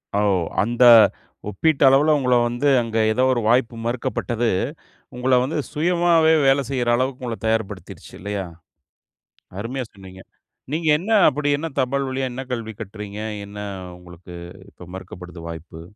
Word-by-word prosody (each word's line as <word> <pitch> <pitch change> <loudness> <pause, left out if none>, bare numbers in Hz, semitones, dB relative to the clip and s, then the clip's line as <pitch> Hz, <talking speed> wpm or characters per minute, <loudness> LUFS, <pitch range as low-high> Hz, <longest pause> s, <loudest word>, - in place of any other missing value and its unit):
ஓ! - - +2 0.4
அந்த 120 +4 +1 0.7
ஒப்பிட்டளவில 140 +5 +3
உங்கள 125 -2 +2
வந்து 120 +4 -1
அங்க 115 -1 -4
ஏதோ 125 +4 +1
ஒரு 120 - -1
வாய்ப்பு 120 0 +2
மறுக்கப்பட்டது, 120 -1 -2 0.7
உங்கள 125 +1 -1
வந்து 140 +5 -3
சுயமாவே 165 0 +3
வேலை 135 +1 +4
செய்யிற 125 -3 -1
அளவுக்கு 130 +1 -2
உங்கள 115 -2 -4
தயார் 110 -2 +1
படுத்திருச்சு 95 -4 -11
இல்லயா! 100 +1 -4 1.1
அருமையா 125 +4 -4
சொன்னீங்க, 95 -2 -13 0.5
நீங்க 160 +1 -2
என்ன 200 +7 -5 0.2
அப்படி? 145 +2 -2
என்ன 165 +3 -4
தபால் 135 +1 0
வழியா 130 0 -2
என்ன 130 +2 -6
கல்வி 115 -2 -5
கற்றீங்க? 105 0 -8 0.3
என்ன 100 +1 -12 0.4
உங்களுக்கு 90 0 -13 0.4
இப்ப 90 - -14
மறுக்கப்படுது 90 -2 -10
வாய்ப்பு? 80 0 -9
120 Hz, 135 wpm, -22 LUFS, 105-135 Hz, 1.1 s, வேலை